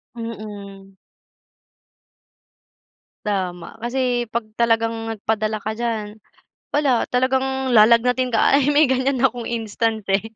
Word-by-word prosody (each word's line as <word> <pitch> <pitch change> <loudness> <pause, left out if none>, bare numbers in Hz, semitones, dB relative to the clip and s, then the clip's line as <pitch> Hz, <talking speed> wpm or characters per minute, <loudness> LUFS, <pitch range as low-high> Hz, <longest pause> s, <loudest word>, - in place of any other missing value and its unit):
Mm. 205 -4 -8 2.3
Tama. 185 -2 -3
Kasi 245 +1 -1
'pag 230 -2 -2
talagang 225 -1 0
nagpadala 215 0 -2
ka 215 +1 -4
diyan, 220 -3 -3 0.5
wala, 280 -5 +2
talagang 265 0 0
lalagnatin 235 +3 +4
ka. 225 +3 +3
Ay, 280 0 +3
may 295 +1 +5
ganyan 260 +1 0
akong 240 -2 0
instance 225 -1 -2
eh, 195 +1 +2
230 Hz, 105 wpm, -21 LUFS, 215-255 Hz, 2.3 s, may